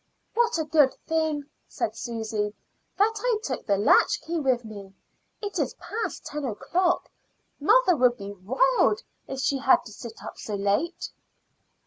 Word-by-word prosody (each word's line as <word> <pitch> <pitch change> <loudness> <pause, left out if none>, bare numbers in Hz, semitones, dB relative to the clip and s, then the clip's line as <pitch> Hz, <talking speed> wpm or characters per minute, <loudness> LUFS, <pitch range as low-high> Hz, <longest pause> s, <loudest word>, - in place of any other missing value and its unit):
"What 475 -2 +2
a 320 - 0
good 295 -3 +4
thing," 315 -2 0 0.2
said 215 - -3
Susy, 220 -2 -3 0.4
"that 425 +3 +4
I 485 -1 +1
took 260 - -4
the 200 -2 +3
latchkey 320 - +3
with 255 -5 +1
me! 200 -3 -10 0.5
It 410 - -3
is - - -1
past 455 +2 -5
ten 300 0 -5
o'clock. 350 - 0 0.5
Mother - - +5
would 250 -3 +3
be 200 0 -7
wild 430 - +2 0.2
if 270 - -5
she 275 +1 +1
had 340 +6 +4
to 215 - -10
sit 225 +1 -10
up - - -8
so 210 - -4
late." 205 - -1
270 Hz, 150 wpm, -26 LUFS, 215-355 Hz, 0.5 s, Mother